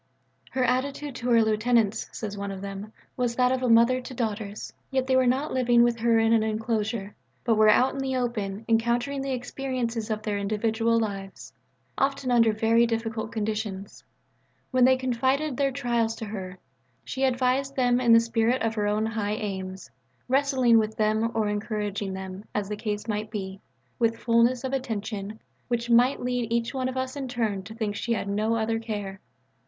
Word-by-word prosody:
"Her 260 - 0
attitude 275 +3 -1
to 245 0 -3
her 230 -1 +5
lieutenants," 220 0 +1
says 210 -2 -5
one 200 0 -4
of 195 -1 -6
them, 200 +2 -6 0.2
"was 245 -2 -1
that 250 0 +3
of 260 0 0
a 250 - +1
mother 235 +3 +5
to 255 - -9
daughters. 215 -3 -4 0.2
Yet 265 -1 0
they 260 0 +2
were 260 -1 +4
not 265 +5 0
living 240 -2 +4
with 240 -1 +1
her 230 0 +3
in 225 0 +3
an 225 - +4
enclosure, 220 -1 -2 0.3
but 230 - +2
were 215 0 +5
out 255 +5 +4
in 275 - -5
the 265 -1 -1
open 220 -4 -2
encountering 240 +4 +1
the 270 - -3
experiences 245 -3 -3
of 215 -1 -2
their 205 -2 -1
individual 225 +3 +1
lives, 195 -3 -5 0.5
often 275 -1 0
under 230 -2 +5
very 225 +2 +3
difficult 225 -1 -3
conditions. 210 -2 -4 0.7
When 255 -1 +5
they 260 0 +5
confided 260 +3 0
their 275 +1 +1
trials 235 -4 0
to 225 - -6
her, 190 -3 -6 0.5
she 265 - -3
advised 260 +1 +1
them 250 -2 +2
in 240 -2 +4
the 230 - +9
spirit 230 +2 +1
of 225 0 0
her 210 -2 -1
own 210 +1 +1
high 215 -2 -2
aims, 190 -3 -5 0.4
wrestling 260 -3 +4
with 215 0 -2
them 215 +1 +2
or 220 -1 +1
encouraging 205 -1 -2
them, 190 +1 -7
as 205 -1 -1
the 210 - -2
case 210 0 -4
might 210 0 -2
be, 195 -3 -6 0.4
with 230 -1 +2
fulness 235 +2 +2
of 265 0 -3
attention, 215 -4 -4 0.3
which 240 -1 -1
might 245 +3 +5
lead 245 -2 -2
each 235 +1 0
one 260 -1 -1
of 260 - -5
us 260 +1 -2
in 275 -2 -4
turn 225 -5 -1
to 220 +4 -10
think 215 -3 -2
that - - -6
she 235 - 0
had 210 - -2
no 215 +3 0
other 225 0 0
care." 205 -4 -5
230 Hz, 190 wpm, -26 LUFS, 215-250 Hz, 0.7 s, the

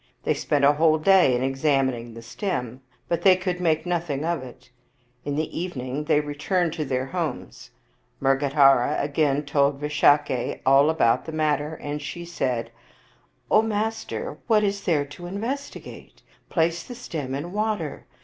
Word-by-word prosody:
They - - +2
spent 145 -1 +1
a 145 - +6
whole 155 +1 +3
day 175 -5 +5
in 125 - -1
examining 135 -4 0
the 115 - -10
stem, 125 - -4 0.3
but 170 -1 -1
they 185 0 +6
could 180 -1 -3
make 160 -2 +1
nothing 165 -5 -2
of 170 -3 -1
it. 125 -1 -13 0.5
In 145 - -2
the 155 +1 -3
evening 145 -5 -4
they 150 -1 +3
returned 155 +4 -1
to 155 - -3
their 130 -1 -1
homes. 155 - -5 0.5
Mrgadhara 135 0 +3
again 145 0 0
told 140 0 +1
Visakha 145 -3 +2
all 135 +3 +5
about 130 -6 +2
the 160 - -6
mat 155 -2 +1
ter, 150 +2 -5
and 145 -1 -5
she 150 +5 -6
said, 130 -8 -2 0.4
" - - -34
O 215 - +6
master, 220 0 -3
what 215 -3 +4
is 200 0 -1
there 155 -6 +2
to 145 +5 -13
investi 230 +10 -4
gate? - - -13 0.3
Place 165 0 +1
the 245 - -9
stem 150 - -5
in 155 +6 -5
water. 210 -8 -2
150 Hz, 165 wpm, -24 LUFS, 135-175 Hz, 0.5 s, a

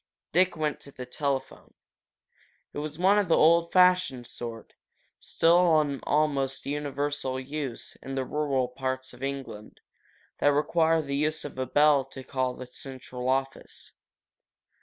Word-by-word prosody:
Dick 180 +1 +3
went 155 -1 -1
to 140 - -12
the 130 -2 -8
telephone. 135 +1 -4 1.0
It - - -4
was 150 0 -5
one 195 +4 +4
of 200 - 0
the 165 - +4
old 170 +1 +4
fashioned 180 -9 +4
sort, 115 -1 -8 0.5
still 170 -1 +4
in 145 -3 -1
almost 140 -3 0
universal 145 -2 -2
use 135 -2 -5
in 135 - -6
the 135 -1 -1
rural 140 -3 0
parts 130 +1 -4
of 125 - -15
England, 135 -6 -6 0.6
that 145 - +4
require 160 +2 +2
the 140 -1 -3
use 155 +2 -1
of 140 -3 -7
a 130 - -1
bell 145 +1 +4
to 135 0 -10
call 130 -1 -2
the 130 - -8
central 125 -1 -7
office. 135 0 -3
140 Hz, 145 wpm, -27 LUFS, 130-155 Hz, 1.0 s, one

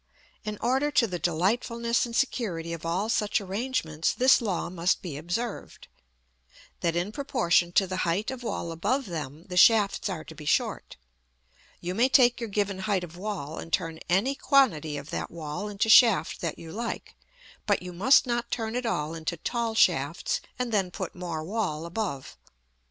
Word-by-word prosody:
In 210 -1 -4
order 265 +4 +2
to 260 -4 +3
the 180 -5 -4
delightfulness 235 +8 0
and 230 - -7
security 175 -11 -1
of 165 0 -6
all 185 +5 0
such 215 -2 +1
arrangements, 195 -6 -1
this 260 +1 +5
law 200 -6 -1
must 175 +1 0
be 170 -6 -5
observed: 175 +10 -5 0.9
that 170 -1 0
in 175 +4 -1
proportion 180 -10 +1
to 195 - +4
the 185 0 -4
height 185 +6 0
of 260 -1 -7
wall 200 -7 -3
above 255 - -1
them, 155 -4 -6
the 180 - -5
shafts 205 0 +5
are 170 -5 -4
to - - -11
be 155 - -11
short. - - 0 0.9
You 175 +1 -3
may 240 +6 +3
take 245 -3 +5
your 230 -2 -4
given 200 -1 -1
height 190 -2 0
of 175 -1 -9
wall, 180 -6 -5
and 165 - -8
turn 165 -1 -1
any 200 +10 +2
quantity 195 - +2
of 140 +1 -8
that - - -3
wall 165 +5 -5
into 205 +1 -1
shaft 225 -1 +5
that 165 -3 -3
you 165 -1 -10
like; 230 +4 -5 0.5
but - - +2
you 180 0 -7
must 225 +13 +5
not 240 -1 -2
turn 225 -1 -3
it 250 -1 -1
all 155 -7 -1
into 165 +1 -4
tall 230 +5 -2
shafts, - - +2 0.2
and 250 -1 -2
then 195 -4 +1
put - - -5
more 170 -3 -5
wall 175 -4 -2
above. 170 -7 -4
195 Hz, 180 wpm, -27 LUFS, 170-235 Hz, 0.9 s, this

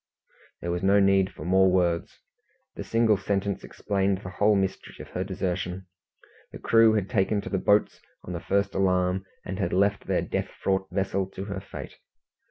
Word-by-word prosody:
There 85 - -3
was 90 0 -2
no 100 +1 +4
need 95 -1 +3
for 75 - -9
more 95 +1 +4
words. 85 -2 0 0.5
The - - -6
single 115 -2 +2
sentence 100 0 -2
explained 100 -1 -1
the 90 - -7
whole 105 +3 +3
mystery 95 -1 -2
of - - -9
her 90 - -3
desertion. 95 -1 -3 0.7
The - - -8
crew 115 -1 +4
had 105 -3 0
taken 105 -2 +1
to - - -7
the 95 - 0
boats 105 +2 +2 0.2
on 90 - -6
the 85 - -3
first 100 +2 0
alarm, 95 0 +1 0.2
and 95 +2 -5
had 100 - -1
left 100 +2 +1
their - - +1
death - - -3
fraught 95 0 0
vessel 95 0 -1
to 95 0 -7
her 100 -2 -4
fate. 95 - -10
95 Hz, 180 wpm, -26 LUFS, 95-100 Hz, 0.7 s, no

